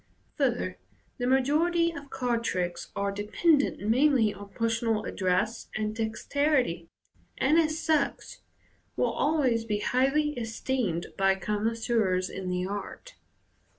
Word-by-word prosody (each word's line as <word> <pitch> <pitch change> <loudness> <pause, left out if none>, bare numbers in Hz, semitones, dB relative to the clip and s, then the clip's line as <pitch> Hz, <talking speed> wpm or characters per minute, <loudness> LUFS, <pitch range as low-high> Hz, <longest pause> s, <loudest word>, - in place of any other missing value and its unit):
Further, - - -1 0.4
the 245 - 0
majority 315 +6 +2
of 285 -4 -9
card 240 -3 -1
tricks 175 -5 -2
are 200 0 -1
dependent 240 - +1
mainly 245 -2 +4
on 200 0 -11
personal 225 0 0
address 190 +5 -1
and 215 0 -2
dexterity, 225 - 0 0.5
and, 300 +5 +4
as 310 -1 +1
such, 305 -4 0 0.6
will - - +1
always 270 -7 +1
be 215 -2 -1
highly 275 +6 +2
esteemed 225 -5 -2
by 195 0 +4
connoisseurs 210 -2 0
in 185 -1 -5
the 180 0 -1
art. 205 - -6
230 Hz, 120 wpm, -28 LUFS, 200-280 Hz, 0.6 s, mainly